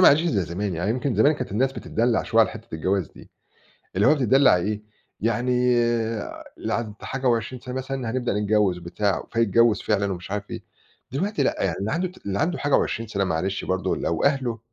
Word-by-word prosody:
ما 185 - +9
عادتش 145 +3 +5
زي 145 - +1
زمان، 90 +3 -3
يعني 90 +6 -1
يمكن 125 +1 -1
زمان 140 +9 +5
كانت 130 -3 -5
الناس 130 +5 +1
بتتدلّع 115 -1 0
شوية 115 - +3
على - - 0
حتّة 110 -5 -9
الجواز 95 +2 0
دي، - - -16 0.7
اللي 100 - +4
هو 150 - +6
بتتدلّع 135 -4 +5
إيه، 105 +4 -2 0.4
يعني 120 +3 +1 1.1
اللي - - -2
عدِّت 110 -3 -4
حاجة 135 0 -3
و20 120 +2 0
سَنة 125 0 -7
مثلًا 130 -2 -3
هنبدأ 120 -4 -1
نتجوّز 105 -3 +2
بتاع، 90 +2 -1
فيتجوّز 115 0 +3
فعلًا 100 -2 +1
ومش 90 +1 -7
عارف 105 0 -4
إيه، - - -6 0.5
دلوقتي 195 +10 0
لأ - - 0
يعني 95 -3 0
اللي 100 +3 -2
عنده 180 +3 0
ت 180 - -17
اللي 100 0 -1
عنده 180 +2 0
حاجة 145 0 0
و20 115 0 -1
سَنة 100 -2 0
معلش 95 +3 -1
برضه 95 0 -1
لو 85 - -1
أهله 130 -5 +1
110 Hz, 200 wpm, -24 LUFS, 100-130 Hz, 1.1 s, ما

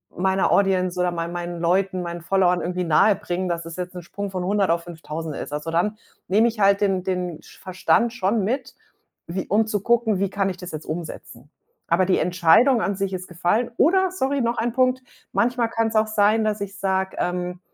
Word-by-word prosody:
meiner 190 +1 +1
Audience 185 -2 +2
oder 180 0 +2
mein 170 0 -4
meinen 175 -1 -5
Leuten, 185 +2 +1
meinen 170 -1 -5
Followern 180 0 +2
irgendwie 180 +1 -2
nahebringen, 180 +1 +2
dass 170 -1 -3
es 165 +1 -8
jetzt 180 0 -5
'n 180 - -7
Sprung 200 +4 -5
von 185 -1 -4
100 195 0 +1
auf 170 0 +1
5.000 160 -2 -6
ist. - - -6
Also, 150 +2 -4
dann 210 +6 0 0.3
nehme 215 +5 +4
ich 225 -2 -4
halt 200 0 +4
den 190 -3 +1
den 180 -3 -3
Sch - - -17
Verstand 185 +5 +1
schon 210 -1 0
mit, 250 +6 -2 0.5
wie 185 +3 -4
um 215 +3 +2
zu 210 -1 -1
gucken, 225 -2 +2
wie 200 0 0
kann 195 0 0
ich 185 - -5
das 180 0 -8
jetzt 155 0 -7
umsetzen? 160 +1 -7 0.4
Aber 175 +2 +3
die 185 - +2
Entscheidung 180 +9 +4
an 200 -1 -1
sich 195 0 -2
ist 185 0 -5
gefallen, 175 +8 0
oder 375 +3 +3
sorry, 280 -6 -1
noch 235 0 0
ein 235 0 -1
Punkt, 255 0 +2 0.3
manchmal 240 -1 +1
kann's 225 -1 -1
auch 215 0 +3
sein, 215 +1 +3
dass 215 -1 -1
ich 200 0 -5
sage, 190 -1 -1
ähm, 180 0 -2
190 Hz, 205 wpm, -23 LUFS, 175-215 Hz, 0.5 s, nehme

